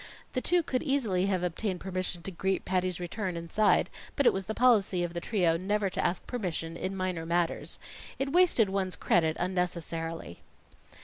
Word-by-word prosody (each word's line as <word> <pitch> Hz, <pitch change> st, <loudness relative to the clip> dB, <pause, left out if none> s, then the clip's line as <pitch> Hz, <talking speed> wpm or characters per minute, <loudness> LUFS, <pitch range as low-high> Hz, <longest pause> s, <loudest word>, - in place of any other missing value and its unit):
The 255 Hz, -, 0 dB
two 350 Hz, +3 st, +3 dB
could 255 Hz, -4 st, -1 dB
easily 225 Hz, -, +1 dB
have 185 Hz, -3 st, 0 dB
obtained 180 Hz, +2 st, -2 dB
permission 185 Hz, -2 st, -3 dB
to 195 Hz, -, -4 dB
greet 190 Hz, +2 st, -1 dB
Patty's 185 Hz, -1 st, 0 dB
return 180 Hz, 0 st, -3 dB
inside; 185 Hz, +5 st, +2 dB, 0.3 s
but 280 Hz, -, +1 dB
it -, -, +6 dB
was 190 Hz, -1 st, -3 dB
the 220 Hz, -, -3 dB
policy 205 Hz, -7 st, +4 dB
of 170 Hz, -1 st, -3 dB
the 170 Hz, -, -3 dB
trio 175 Hz, -5 st, +2 dB
never 200 Hz, +2 st, 0 dB
to -, -, -1 dB
ask 175 Hz, -, 0 dB
permission 170 Hz, -8 st, -3 dB
in 190 Hz, +3 st, -3 dB
minor 185 Hz, -3 st, -2 dB
matters. 170 Hz, 0 st, -1 dB, 0.4 s
It 275 Hz, 0 st, -1 dB
wasted 345 Hz, -, +5 dB
one's 190 Hz, -2 st, -1 dB
credit 160 Hz, -2 st, +2 dB
unnecessarily. 170 Hz, -, -3 dB
185 Hz, 175 wpm, -30 LUFS, 175-210 Hz, 0.4 s, it